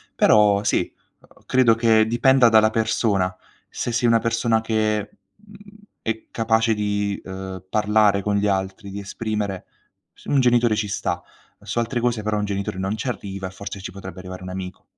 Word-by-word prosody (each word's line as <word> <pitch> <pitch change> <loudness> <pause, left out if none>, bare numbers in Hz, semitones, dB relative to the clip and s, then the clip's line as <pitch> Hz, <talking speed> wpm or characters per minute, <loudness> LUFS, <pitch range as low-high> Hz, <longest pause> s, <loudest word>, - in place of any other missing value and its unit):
Però 105 -1 +4
sì, - - 0 0.3
uhm, - - -24
credo 125 -3 +4
che 110 -1 +4
dipenda 120 +1 +4
dalla 110 -1 +5
persona, 110 -4 0 0.3
se 120 - -3
sei 120 +1 +1
una 115 0 +4
persona 115 -1 +1
che, 110 0 0 0.3
mhmm, 210 0 -17 0.5
è 110 0 -3
capace 115 0 +2
di, 105 -1 -1
uhm, 95 -1 -7
parlare 105 -1 +3
con 105 +1 -1
gli 100 +1 +1
altri, 95 +1 -2
di 100 - -5
esprimere 100 -2 -4 0.5
s - - -20
un 140 - +2
genitore 120 -3 +3
ci 105 -1 -1
sta, 100 - -2 0.4
su 120 - -3
altre 120 +1 -1
cose 120 -2 0
però 105 0 0
un 105 - -1
genitore 100 -2 -3
non 95 +3 -2
ci 110 +4 -5
arriva 100 -4 -5
e - - -9
forse 100 0 -8
ci 95 - -7
potrebbe 95 -1 -9
arrivare 95 0 -8
un 95 - -7
amico. 90 0 -7
105 Hz, 180 wpm, -22 LUFS, 100-115 Hz, 0.5 s, dalla